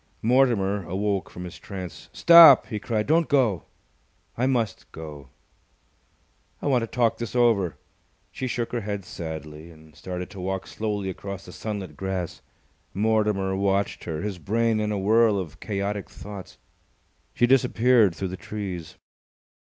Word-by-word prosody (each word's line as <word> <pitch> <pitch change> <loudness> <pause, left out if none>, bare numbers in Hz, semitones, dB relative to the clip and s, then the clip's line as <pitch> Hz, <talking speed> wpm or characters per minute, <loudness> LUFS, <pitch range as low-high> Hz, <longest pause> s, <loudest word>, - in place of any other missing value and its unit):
Mortimer 110 -5 +2
awoke 100 +1 -1
from 90 - -9
his 90 -1 -9
trance. 95 -3 -8
"Stop!" 170 -5 +9
he 105 -4 -5
cried. 110 -1 -1
"Don't 160 +2 +3
go!" 120 - +2 0.7
"I 125 +2 +1
must 115 -7 -1
go." 75 -5 -9 1.3
"I - - -8
want 130 -4 +3
to 115 - -3
talk 115 -1 +1
this 120 +1 -5
over." 115 -8 +2 0.5
She 130 - -4
shook 120 -1 -3
her 120 - -2
head 100 -2 -4
sadly 80 -1 -7
and 80 -2 -17
started 90 0 -6
to 100 - -10
walk 95 +1 -3
slowly 105 -3 -3
across 100 +1 -7
the - - -10
sunlit 105 -4 -5
grass. 95 -3 -4 0.5
Mortimer 105 -2 +1
watched 100 +1 0
her, 80 -2 -4
his 100 -4 -4
brain 115 +5 +1
in 105 0 -1
a 105 - -1
whirl 110 +2 +3
of 90 -6 -6
chaotic 100 -1 -3
thoughts. 100 -2 -10 0.8
She 120 - +4
disappeared 120 -5 +4
through 95 - -3
the 95 - -6
trees. 95 -7 -6
100 Hz, 150 wpm, -25 LUFS, 95-115 Hz, 1.3 s, Stop